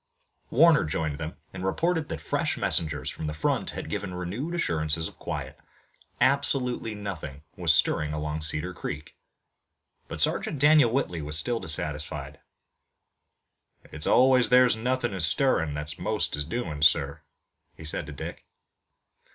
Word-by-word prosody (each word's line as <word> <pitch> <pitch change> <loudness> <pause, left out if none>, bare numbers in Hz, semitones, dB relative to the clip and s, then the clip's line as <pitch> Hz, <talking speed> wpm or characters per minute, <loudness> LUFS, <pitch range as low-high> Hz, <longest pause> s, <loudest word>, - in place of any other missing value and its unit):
Warner 165 -2 +5
joined 75 -1 -2
them, 80 +1 -5 0.2
and 90 -1 -6
reported 160 - 0
that - - -4
fresh - - -1
messengers 75 -4 -1
from 80 - -6
the 75 - -4
front 75 - 0
had - - -6
given 90 - -4
renewed 105 - -4
assurances 80 - -1
of - - -14
quiet. - - -5 0.6
Absolutely 130 -4 +3
nothing 80 -9 -6
was 85 -4 +2
stirring 75 0 +3
along 75 0 -3
Cedar 75 -1 -1
Creek, 75 +1 -6 0.9
but - - -7
Sergeant - - 0
Daniel 150 -2 +6
Whitley 100 - -1
was 75 +1 -3
still 120 +7 -1
dissatisfied. 75 -4 -4 1.5
"It's 75 - -4
always 130 -1 +5
where 125 0 +7
nothin' 120 0 -1
is 90 -5 0
stirrin' 80 - +1
that 75 +1 -3
most - - 0
is 75 -1 -3
doin', 80 -7 -4
sir," 70 -1 +3 0.6
he - - -11
said 80 0 -1
to - - -7
Dick. 70 - -7
80 Hz, 145 wpm, -27 LUFS, 75-125 Hz, 1.5 s, where